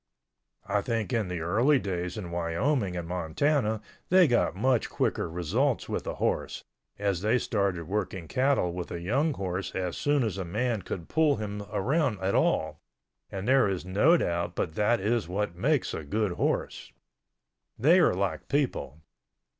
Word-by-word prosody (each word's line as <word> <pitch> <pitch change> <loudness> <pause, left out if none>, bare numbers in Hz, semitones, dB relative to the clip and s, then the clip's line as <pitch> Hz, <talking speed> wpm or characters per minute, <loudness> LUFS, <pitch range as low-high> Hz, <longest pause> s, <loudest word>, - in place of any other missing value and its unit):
I 100 0 +1
think 115 +2 -2
in 110 -4 +1
the 90 -2 -4
early 115 - +3
days 90 -4 -3
in 90 -5 -6
Wyoming 90 - 0
and 85 -1 -4
Montana 105 - 0 0.3
they 185 -1 +6
got 120 -7 +2
much 125 +4 +1
quicker - - -1
results 85 -1 0
with - - -3
a - - -3
horse, - - -2 0.3
as 100 -3 -1
they 110 +4 +3
started 100 -8 -1
working 95 -3 -3
cattle 130 - +1
with 90 -1 -5
a 85 - -5
young 130 - +1
horse 95 -1 -4
as 90 -2 -2
soon 145 -2 +1
as 100 -4 -2
a - - -2
man 110 +5 -1
could 85 -3 -6
pull 155 -2 +3
him 105 -1 -5
around 120 - 0
at 95 +1 -1
all, - - +1 0.5
and 95 +2 -5
there 130 -5 +4
is 95 -2 -3
no 105 - +4
doubt 85 - -1
but 80 - -2
that 105 +5 +2
is 110 +1 0
what 100 0 -2
makes 135 - +1
a 80 - -4
good 105 +7 -1
horse. - - -2 0.9
They 160 +10 +5
are 170 - +4
like 90 -5 -2
people. 125 - -1
100 Hz, 170 wpm, -28 LUFS, 90-125 Hz, 0.9 s, they